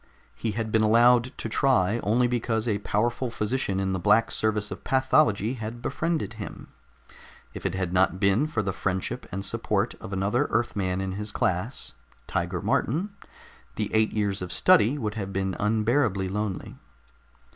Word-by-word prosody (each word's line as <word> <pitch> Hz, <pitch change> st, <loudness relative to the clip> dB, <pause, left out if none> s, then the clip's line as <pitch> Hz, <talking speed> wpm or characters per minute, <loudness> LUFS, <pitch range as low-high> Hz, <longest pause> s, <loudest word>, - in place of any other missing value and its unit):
He 105 Hz, -, -3 dB
had 110 Hz, 0 st, -3 dB
been 110 Hz, -, +3 dB
allowed 120 Hz, +2 st, +5 dB
to -, -, -4 dB
try 115 Hz, -4 st, +2 dB
only 120 Hz, +4 st, +2 dB
because 120 Hz, -2 st, -1 dB
a 105 Hz, -3 st, 0 dB
powerful 120 Hz, +5 st, -1 dB
physician 105 Hz, -3 st, -1 dB
in 95 Hz, -1 st, 0 dB
the 95 Hz, -, -1 dB
Black 115 Hz, +6 st, +3 dB
Service 105 Hz, -1 st, 0 dB
of -, -, -7 dB
Pathology 130 Hz, -4 st, +2 dB
had 110 Hz, +2 st, -5 dB
befriended 160 Hz, -1 st, -2 dB
him. -, -, -8 dB, 0.8 s
If -, -, -3 dB
it -, -, -4 dB
had 90 Hz, -2 st, -2 dB
not 95 Hz, 0 st, +2 dB
been 100 Hz, +10 st, +3 dB
for 115 Hz, -8 st, -1 dB
the 95 Hz, -1 st, -2 dB
friendship 95 Hz, -1 st, -3 dB
and 95 Hz, +1 st, -3 dB
support -, -, 0 dB
of -, -, -8 dB
another 100 Hz, +8 st, +1 dB
Earthman 95 Hz, -5 st, 0 dB
in 95 Hz, -1 st, -3 dB
the 105 Hz, +1 st, -4 dB
class, 95 Hz, +8 st, -2 dB, 0.3 s
Tiger -, -, -2 dB
Martin, 185 Hz, -, 0 dB, 0.6 s
the 105 Hz, -1 st, -3 dB
eight 110 Hz, 0 st, +3 dB
years 100 Hz, -3 st, -1 dB
of 90 Hz, -, -5 dB
study 115 Hz, +8 st, +4 dB
would 110 Hz, -6 st, -3 dB
have 100 Hz, -3 st, -4 dB
been 95 Hz, -1 st, -1 dB
unbearably 110 Hz, -1 st, +1 dB
lonely. 105 Hz, -1 st, -4 dB
105 Hz, 165 wpm, -26 LUFS, 95-120 Hz, 0.8 s, allowed